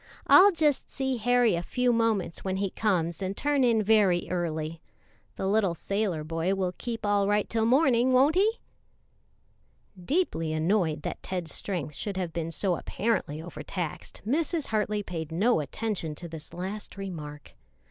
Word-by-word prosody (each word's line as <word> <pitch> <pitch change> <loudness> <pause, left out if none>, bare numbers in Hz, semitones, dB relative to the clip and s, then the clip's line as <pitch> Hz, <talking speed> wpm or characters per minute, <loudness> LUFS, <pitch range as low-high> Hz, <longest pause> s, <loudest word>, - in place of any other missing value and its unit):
I'll 400 +2 +8
just 305 -5 +1
see 265 -2 -2
Harry 245 -1 +3
a 170 - 0
few 250 +6 +1
moments 225 -7 0
when 190 0 -1
he 195 -1 -1
comes 170 -6 0
and 195 +1 -3
turn 290 -2 +1
in 230 -3 +3
very 200 -5 +3
early. 160 -2 -2 0.5
The - - -3
little 195 -3 +2
sailor 195 -3 -2
boy 165 +4 -1
will 185 -2 -1
keep 230 -3 -4
all 205 -1 +2
right 205 0 +2
till 225 -1 0
morning, 255 -2 +4
won't 265 +4 +5
he?'" 420 +6 +2 1.4
Deeply 175 - 0
annoyed 160 -2 +1
that - - -4
Ted's 175 -5 -4
strength 170 -7 -3
should 195 +6 -4
have 175 -3 -3
been 165 0 -3
so 175 +1 0
apparently 175 -8 -2
overtaxed, 175 -1 -6
Mrs. 310 - 0
Hartley 210 -1 0
paid 165 -4 -5
no 205 +6 +2
attention 160 - -3
to 170 - -8
this 160 -2 -9
last 195 +4 -6
remark. 150 -7 -7
195 Hz, 155 wpm, -28 LUFS, 170-230 Hz, 1.4 s, I'll